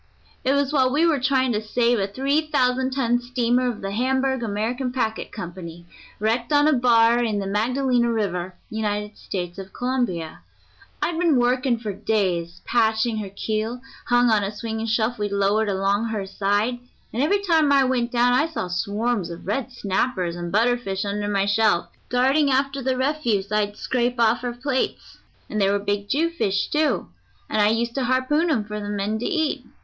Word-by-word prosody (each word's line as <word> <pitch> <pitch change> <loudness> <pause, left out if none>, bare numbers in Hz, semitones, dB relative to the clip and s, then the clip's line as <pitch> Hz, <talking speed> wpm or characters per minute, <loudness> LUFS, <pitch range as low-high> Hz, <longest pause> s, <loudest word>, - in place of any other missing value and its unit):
It 265 - +2
was 280 0 +1
while 260 -3 +3
we 305 +5 +3
were 320 -4 +2
trying 260 -1 +2
to 210 -2 0
save 235 +2 +1
a 195 - 0
three 275 +8 0
thousand 260 -3 +1
ton 245 -2 +1
steamer 245 0 +1
of 235 - -5
the 195 - -4
Hamburg 265 +3 0
American 230 +4 -2
Packet 225 -4 -2
Company, 175 -3 -8 0.3
wrecked 230 +4 0
on 290 0 +4
a 310 - +4
bar 240 -1 +4
in 220 -3 0
the 200 - -2
Magdalena 240 +4 +1
River, 185 -5 -2 0.2
United 210 -1 -2
States 175 -1 -5
of 190 0 -9
Colombia. 240 -11 -2 0.6
I'd 335 -1 -1
been 335 -4 +3
working 250 0 +2
for 215 -3 -5
days 185 -5 -1
patching 225 -1 +1
her 205 -2 -4
keel, 220 +4 -3 0.3
hung 245 -1 +4
on 210 -2 +3
a 195 - -2
swinging 220 +1 -4
shelf 220 +1 0
we'd 205 -1 -2
lowered 200 +2 +1
along 200 +3 +1
her 215 -3 -3
side, 205 +5 0 0.3
and 240 - -1
every 400 +7 +2
time 320 -6 +3
I 275 -1 +5
went 250 -2 0
down 245 0 +3
I 300 +6 +3
saw 310 - -4
swarms 200 +2 -1
of 170 0 -9
red 245 +6 -2
snappers 190 -5 -1
and 175 0 -5
butterfish 220 -2 +1
under 205 +1 -2
my 200 -1 +1
shelf, 205 -3 +2 0.2
darting 270 +4 +3
after 275 +1 +1
the 260 0 0
refuse 255 -8 0
I'd 210 -1 0
scrape 245 -1 -1
off 230 0 +4
her 245 -1 -4
plates; 260 +2 -3 0.3
and 215 - -2
there 195 0 +3
were 205 - +2
big 205 0 -2
jewfish, 300 -11 0
too, 305 0 +1 0.4
and 215 - 0
I 205 - +5
used 230 +2 0
to 265 -1 -1
harpoon 260 +7 +1
'em 230 -9 +1
for 210 0 -5
the 205 0 -5
men 205 +1 -2
to 240 - -4
eat. 315 -5 0
230 Hz, 185 wpm, -23 LUFS, 205-255 Hz, 0.6 s, I